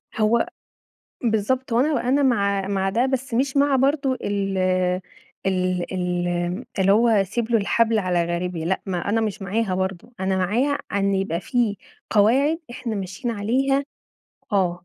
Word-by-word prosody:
هو 225 +7 +2 0.8
بالضبط، 235 +3 0
هو 230 - +4
أنا 285 -3 +1
أنا 280 +3 +3
مع 200 -6 +1
مع 195 -1 0
ده 235 +6 +1
بس 265 -1 -2
مش 270 +4 0
مع 280 -1 +4
برضه 275 +1 +2
ال 200 -5 -2 0.9
ال 185 -1 0
ال 175 +2 -1
اللي 195 0 +4
هو 230 +3 +4
اسيب 220 +2 +1
له 235 - +4
الحبل 225 +2 +2
على 180 -3 +1
غاربه 175 0 -2
لأ، 190 +3 0
ما 185 -2 -1
أنا 225 +2 +2
مش 210 -2 -3
معاها 195 0 -1
برضه، 190 +4 -3
أنا 190 0 0
معاها 235 +10 +1
إن 200 0 +1
يبقى 190 -3 -1
في 230 0 0 0.3
قواعد 260 +9 +3
إحنا 240 -2 -4
ماشيين 195 +5 -4
عليها 265 +7 +1 0.7
آه. 180 -3 +1
205 Hz, 155 wpm, -23 LUFS, 190-245 Hz, 0.9 s, هو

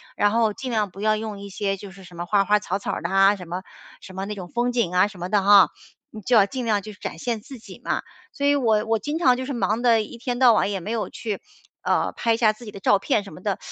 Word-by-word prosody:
然 205 0 +2
后 225 -2 +2
尽 255 +3 -6
量 215 -3 0
不 195 - -10
要 215 0 +2
用 215 -2 -6
一 200 - -8
些 195 0 -2
就 195 0 -10
是 190 -1 -14
什 175 - -14
么 175 +1 -5
花 195 +2 +2
花 210 +1 +3
草 195 -1 -3
草 200 - -3
儿 - - -4
的 170 - -3
啊， 195 +1 +5
什 180 -3 -10
么 180 +2 -4 0.4
什 185 - -12
么 190 - -3
那 210 - -4
种 180 -3 -7
风 240 +5 -1
景 225 -8 0
啊 185 +3 +5
什 190 -3 -13
么 180 - -4
的 205 0 +3
哈， 195 -5 +7 0.4
你 215 - -9
就 235 +3 +3
要 200 - +6
尽 260 +2 -5
量 215 -3 +1
去 215 +1 -9
展 - - -7
现 235 -5 -2
自 260 +2 -11
己 - - -13
嘛。 - - -1 0.3
所 280 - -3
以 285 - +4
我 220 -5 +2
我 225 0 +1
经 300 +6 -3
常 255 -7 +5
就 260 +1 -4
是 280 - -5
忙 225 -2 0
得 230 -2 +4
一 235 - -10
天 245 0 -3
到 250 -3 +7
晚 210 - +2
也 195 - -2
没 190 +5 -6
有 230 -2 -2
去， 215 -4 -5 0.4
呃， - - +1
拍 230 -1 +1
下 220 -2 +3
自 235 +3 -13
己 210 - -8
的 - - -9
照 195 +1 +3
片 205 +1 0
什 195 - -11
么 180 - -12
的。 200 0 -1
210 Hz, 320 characters per minute, -23 LUFS, 195-235 Hz, 0.4 s, 哈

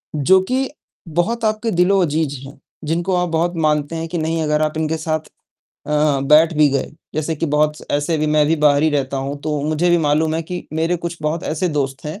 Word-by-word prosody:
जो 185 +7 +4
कि 260 +1 0 0.4
बहुत 220 +8 -1
आपके 215 +1 0
दिलो-अजीज 170 -5 +2
हैं, 135 - -12 0.3
जिनको 175 +4 0
आप 180 -1 0
बहुत 170 +2 0
मानते 150 +1 0
हैं 165 0 -3
कि 175 +1 -4
नहीं 160 +1 -1
अगर 150 0 +1
आप 155 0 -1
इनके 160 0 -1
साथ 155 0 -1 0.7
अ, 150 -2 +2
बैठ 155 +4 +5
भी 150 -1 +5
गए, 140 - -1 0.3
जैसे 155 +1 -1
कि 165 - -1
बहुत 150 0 +3 0.2
ऐसे 145 +3 0
भी 155 - 0
मैं 150 0 +3
भी 165 - +3
बाहर 145 -1 +3
ही 160 - +4
रहता 140 -2 -1
हूँ 135 +2 -3
तो 150 -2 -2
मुझे 155 +3 0
भी 175 - +4
मालूम 155 +2 +2
है 165 - 0
कि 180 +2 -6
मेरे 165 +3 0
कुछ 170 0 -5
बहुत 155 +2 -1
ऐसे 165 +4 -1
दोस्त 135 -3 -2
हैं, 155 +8 -6
155 Hz, 215 wpm, -19 LUFS, 150-170 Hz, 0.7 s, बैठ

